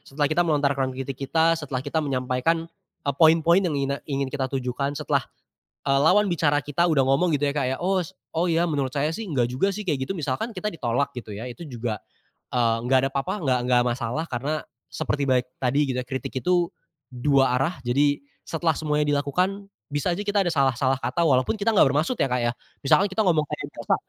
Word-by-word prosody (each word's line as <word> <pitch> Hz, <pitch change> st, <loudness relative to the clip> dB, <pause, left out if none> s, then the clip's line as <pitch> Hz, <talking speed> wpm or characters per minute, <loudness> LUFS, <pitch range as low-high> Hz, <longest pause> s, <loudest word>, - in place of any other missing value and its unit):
setelah 145 Hz, +2 st, -1 dB
kita 175 Hz, -, +2 dB
melontarkan 140 Hz, -5 st, +1 dB
kritik 135 Hz, +1 st, -3 dB, 0.2 s
kita 165 Hz, 0 st, +4 dB
setelah 145 Hz, -5 st, -3 dB
kita 160 Hz, +2 st, 0 dB
menyampaikan, 135 Hz, +3 st, 0 dB, 0.4 s
eee, 140 Hz, -, +1 dB
poin-poin 165 Hz, +3 st, +6 dB
yang 170 Hz, -6 st, -1 dB
ina 140 Hz, 0 st, -1 dB
ingin 135 Hz, -2 st, -2 dB
kita 135 Hz, -2 st, -1 dB
tujukan 135 Hz, +2 st, -2 dB
setelah, 145 Hz, -2 st, +1 dB, 0.7 s
eee, 135 Hz, 0 st, +3 dB
lawan 205 Hz, +6 st, +5 dB
bicara 155 Hz, -5 st, +2 dB
kita 145 Hz, +3 st, -1 dB
udah 135 Hz, -4 st, +3 dB
ngomong 140 Hz, +7 st, +3 dB
gitu 145 Hz, -, 0 dB
ya 140 Hz, -, 0 dB
kayak, 130 Hz, -2 st, -1 dB
"Os 185 Hz, -1 st, 0 dB, 0.2 s
oh 170 Hz, +2 st, +1 dB
iya 165 Hz, +1 st, +2 dB
menurut 140 Hz, -5 st, -1 dB
saya 150 Hz, +4 st, -1 dB
sih 225 Hz, -, -5 dB
nggak 125 Hz, -6 st, +2 dB
juga 195 Hz, +10 st, +2 dB
sih," 210 Hz, +1 st, -5 dB
kayak 145 Hz, -6 st, 0 dB
gitu 195 Hz, -, -2 dB
misalkan 145 Hz, -, -2 dB
kita 210 Hz, -2 st, -6 dB
ditolak 140 Hz, -, -1 dB
gitu 125 Hz, -3 st, -7 dB
ya 105 Hz, +4 st, -6 dB
itu 125 Hz, +6 st, -8 dB
juga, 120 Hz, -, -4 dB, 0.5 s
eee, 115 Hz, -2 st, +2 dB
nggak 130 Hz, +2 st, +3 dB
ada -, -, +1 dB
apa-apa 135 Hz, +6 st, -1 dB
nggak 130 Hz, -1 st, +3 dB
nggak 125 Hz, 0 st, +3 dB
masalah 125 Hz, +5 st, -2 dB
karena 145 Hz, +3 st, -3 dB, 0.2 s
seperti 140 Hz, -2 st, -1 dB
balik 125 Hz, -1 st, +2 dB, 0.2 s
tadi 130 Hz, +3 st, +2 dB
gitu -, -, -2 dB
ya -, -, -16 dB
kritik 130 Hz, 0 st, -5 dB
itu, 180 Hz, -1 st, +2 dB, 0.4 s
2 135 Hz, +1 st, +2 dB
arah 135 Hz, +7 st, 0 dB
jadi 145 Hz, +4 st, +2 dB, 0.2 s
setelah 165 Hz, 0 st, 0 dB
semuanya 150 Hz, 0 st, 0 dB
dilakukan, 185 Hz, +8 st, -1 dB, 0.2 s
bisa 145 Hz, +5 st, -1 dB
aja 200 Hz, +4 st, -3 dB
kita 205 Hz, -1 st, +2 dB
ada 175 Hz, -, 0 dB
salah-salah 135 Hz, -3 st, +2 dB
kata 130 Hz, +7 st, -1 dB
walaupun 130 Hz, 0 st, +3 dB
kita 220 Hz, +1 st, 0 dB
nggak 205 Hz, -, +5 dB
bermaksud 150 Hz, -, +1 dB
ya -, -, +2 dB
Kak, 125 Hz, -1 st, 0 dB
ya 120 Hz, -, +2 dB, 0.3 s
misalkan 155 Hz, +8 st, +4 dB
kita 195 Hz, +2 st, 0 dB
ngomong 160 Hz, -6 st, +2 dB
kayak -, -, -5 dB
biasa -, -, -1 dB
145 Hz, 205 wpm, -24 LUFS, 130-165 Hz, 0.7 s, poin-poin